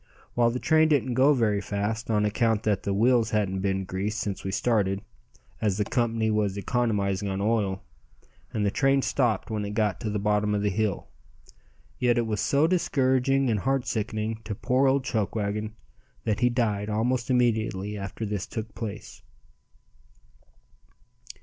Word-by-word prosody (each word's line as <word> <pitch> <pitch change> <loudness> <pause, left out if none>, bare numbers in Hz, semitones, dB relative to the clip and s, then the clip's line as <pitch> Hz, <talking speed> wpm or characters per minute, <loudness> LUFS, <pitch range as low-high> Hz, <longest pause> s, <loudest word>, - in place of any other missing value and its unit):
While 120 -1 +3
the 120 - -2
train 160 +4 +3
didn't 140 -5 +1
go 130 +4 +5
very 105 -5 +1
fast 105 +4 -3
on 105 -1 +2
account 110 +1 +1
that 105 -2 +1
the 100 - -2
wheels 115 +3 +3
hadn't 100 -4 0
been 95 0 -1
greased 100 +4 -3
since 100 -3 -3
we 95 - -3
started, 100 -3 +1 0.6
as 100 -3 +1
the 105 - 0
company 115 -2 0
was 105 -2 0
economizing 100 -2 0
on 95 0 -2
oil, 100 -2 0 0.7
and 105 -1 -1
the 100 - +1
train 135 +3 +2
stopped 115 -6 0
when 105 -1 -2
it 100 0 -5
got 105 -5 0
to 110 - -3
the 105 - -1
bottom 105 0 +1
of 100 - -1
the 105 - +1
hill, 105 0 -1 0.9
yet 120 -1 +2
it 120 - +1
was 105 -2 -2
so 145 +2 +3
discouraging 135 -5 +2
and 105 - +1
heart 135 +3 0
sickening 110 -2 -2
to 105 -1 -4
poor 130 +5 +2
old 135 0 +2
Chuckwagon 105 -1 -2 0.5
that 110 -2 0
he 125 - +3
died 110 -4 0
almost 120 +4 0
immediately 110 -5 +1
after 100 +2 -5
this 100 -2 -3
took 110 -2 -6
place. 105 0 -7
110 Hz, 165 wpm, -26 LUFS, 100-120 Hz, 0.9 s, go